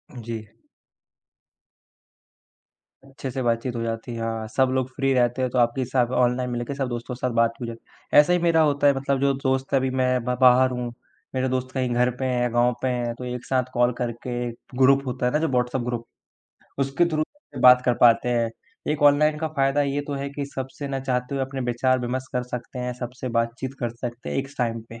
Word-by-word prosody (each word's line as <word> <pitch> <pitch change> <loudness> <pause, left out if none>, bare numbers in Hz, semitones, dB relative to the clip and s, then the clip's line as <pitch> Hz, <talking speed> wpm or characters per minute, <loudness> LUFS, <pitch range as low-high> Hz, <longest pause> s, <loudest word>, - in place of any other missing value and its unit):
जी। 115 -1 -5 2.7
अच्छे 135 0 -7
से 130 - -3
बातचीत 120 +1 0
हो 115 - -2
जाती 115 +1 -4
है, 115 - -5
हाँ, 115 -1 -3
सब 130 +3 +2
लोग 130 -1 0
फ्री 135 -1 +1
रहते 120 0 +2
हैं, 130 - +1
तो - - -2
आपके 120 +2 +2
हिसाब 125 -1 +1
ऑनलाइन 125 0 +2
में 120 - -2
लेके 120 +3 -4
सब 135 -2 -1
दोस्तों 120 +1 -5
के - - -15
साथ 125 - -1
बात 115 0 +3
हो 120 - -2
जा 115 - -5 0.4
ऐसा 150 +4 +7
ही 180 - +3
मेरा 165 -1 +3
होता 145 -2 +3
है 140 - +6
मतलब 135 0 0
जो 140 0 +3
दोस्त 130 0 0
अभी 130 -1 +2
मैं 130 0 +1 0.2
मैं 125 - +1
बाहर 130 0 +6
हूँ, 125 -1 -3 0.5
मेरे 130 0 0
दोस्त 130 0 -2
कहीं 130 -2 0
घर 125 +1 +3
पे 130 - -1
हैं, 125 -2 0
गाँव 120 +1 +3
पे 130 - 0
हैं, 120 -2 -1
तो 125 - -9
एक 125 0 -5
साथ 130 -1 +1
कॉल 120 0 +3
करके 120 0 -3 0.3
ग्रुप 135 +1 +5
होता 125 0 -2
है 125 - +2
ना 150 - +2
जो 160 - +1
व्हाट्सएप 125 0 0
ग्रुप, 120 -1 -3 0.7
उसके 135 +5 +2
थ्रू 155 -2 0 0.4
बात 125 0 +8
कर 125 - +3
पाते 120 0 +5
हैं। 120 -2 +1 0.4
एक 150 -1 -3
ऑनलाइन 150 +1 +5
का 160 0 -2
फायदा 135 +1 +3
ये 140 0 -1
तो 145 - -3
है 140 0 -3
कि 140 0 -4
सबसे 135 +2 -5
ना 135 -1 -2
चाहते 125 0 -2
हुए 135 - 0
अपने 135 0 -6
विचार-विमर्श 130 +1 0
कर 125 - 0
सकते 125 +1 -7
हैं, 125 0 -2
सबसे 125 +1 -5
बातचीत 120 +3 -2
कर 120 - -1
सकते 120 0 -6
हैं - - -2
एक 135 0 -2
स - - -16
टाइम 115 -2 0
पे। 115 0 -10
125 Hz, 220 wpm, -24 LUFS, 120-135 Hz, 2.7 s, बात